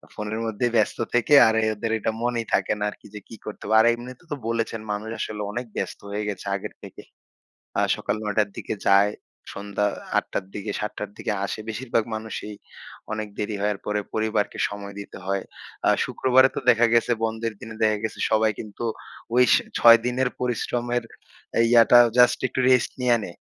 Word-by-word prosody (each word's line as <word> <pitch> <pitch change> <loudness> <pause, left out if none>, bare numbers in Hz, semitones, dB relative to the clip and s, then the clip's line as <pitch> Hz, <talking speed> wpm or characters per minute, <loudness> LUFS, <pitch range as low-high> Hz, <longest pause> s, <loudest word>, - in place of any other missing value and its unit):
ফোনের 105 +1 -4
মধ্যে 110 +2 -1
ব্যস্ত 110 -2 +2 0.2
থেকে 120 +4 +2
আর 110 - +3
এ - - +2
ওদের 110 +2 -3
এটা 110 - -1
মনেই 120 -1 -1
থাকে - - +2
না - - -2
আরকি - - -13
যে - - -5
কি - - -10
করতে 105 - -8
হবে। 110 +2 +2
আর 110 - +6
এমনিতে 125 +5 -9
তো - - 0
বলেছেন 115 -1 -2
মানুষ 105 +2 -4
আসলে 105 -1 -4
অনেক 120 +4 -4
ব্যস্ত - - -4
হয়ে 105 +1 -2
গেছে 100 -1 -6
আগের 100 - -6
থেকে। - - -10 0.8
আ - - +3
সকাল - - -2
৯ 105 -2 -3
টার 105 -1 +3
দিকে - - -4
যায়। 100 +1 +5 0.4
সন্ধ্যা 105 0 -1 0.3
৮ - - +1
টার 95 - -2
দিকে 105 +1 -4
৭ 105 0 -3
টার 105 - -4
দিকে - - -2
আসে। 100 - -5
বেশিরভাগ 115 0 -1
মানুষই 110 -1 -6 0.6
অনেক 110 0 -3
দেরি 105 0 -2
হওয়ার 105 -1 0
পরে 105 0 0
পরিবারকে 110 -1 -1
সময় 100 0 -8
দিতে 100 - -9
হয়। 95 0 -1 0.4
আ - - +6 0.2
শুক্রবারে 130 +1 +4
তো - - -1
দেখা 120 -1 +5
গেছে 115 +1 +3
বন্ধের 115 0 -3
দিনে 110 -1 -9
দেখা 110 -1 +3
গেছে 110 - -4
সবাই 110 0 +3
কিন্তু 110 +2 -6 0.5
ওই 125 - +7
স - - +8 0.2
৬ 115 0 +9
দিনের 125 +1 +1
পরিশ্রমের 120 0 -1 0.7
ইয়াটা 120 0 +7 0.2
জাস্ট 125 -1 +5
একটু 130 - -4
রেস্ট 125 -2 +3
নিয়া 120 -1 +4
নেয়। 85 - -8
110 Hz, 190 wpm, -24 LUFS, 105-120 Hz, 0.8 s, ৬